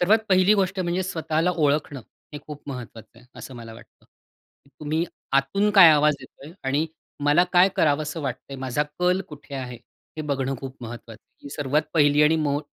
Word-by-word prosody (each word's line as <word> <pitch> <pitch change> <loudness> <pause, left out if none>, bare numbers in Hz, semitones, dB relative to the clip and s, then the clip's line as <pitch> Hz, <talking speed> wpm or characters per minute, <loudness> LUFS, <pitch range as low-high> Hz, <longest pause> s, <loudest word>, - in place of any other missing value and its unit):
सर्वात 205 +6 +4
पहिली 185 +2 +5
गोष्ट 195 -1 0
म्हणजे 180 +1 -1
स्वतःला 165 -1 -1
ओळखणं 145 -2 0 0.3
हे 145 - -6
खूप 150 -1 -9
महत्वाचं 115 -3 -9
आहे 120 - -20
असं 130 - -9
मला 115 -1 -10
वाटतं. - - -18 0.8
तुम्ही 155 +2 -1 0.3
आतून 140 +10 +2
काय 180 -5 +10
आवाज 150 0 +4
येतोय 140 +4 -13
आणि 140 +4 0 0.4
मला 150 +5 +4
काय 180 +2 +6
करावंस 150 0 +1
वाटतंय? 135 -2 -5
माझा 130 +2 -1 0.2
कल 180 +1 +2
कुठे 145 -1 -11
आहे? 125 -2 -5 0.4
हे 155 - -4
बघणं 135 -2 -2
खूप 135 0 -8
महत्वाचं 115 -1 -10 0.2
आहे. - - -9
सर्वात 145 +1 +1
पहिली 145 -1 +4
आणि 155 +2 +4
मो 145 -2 0
150 Hz, 170 wpm, -24 LUFS, 135-165 Hz, 0.8 s, काय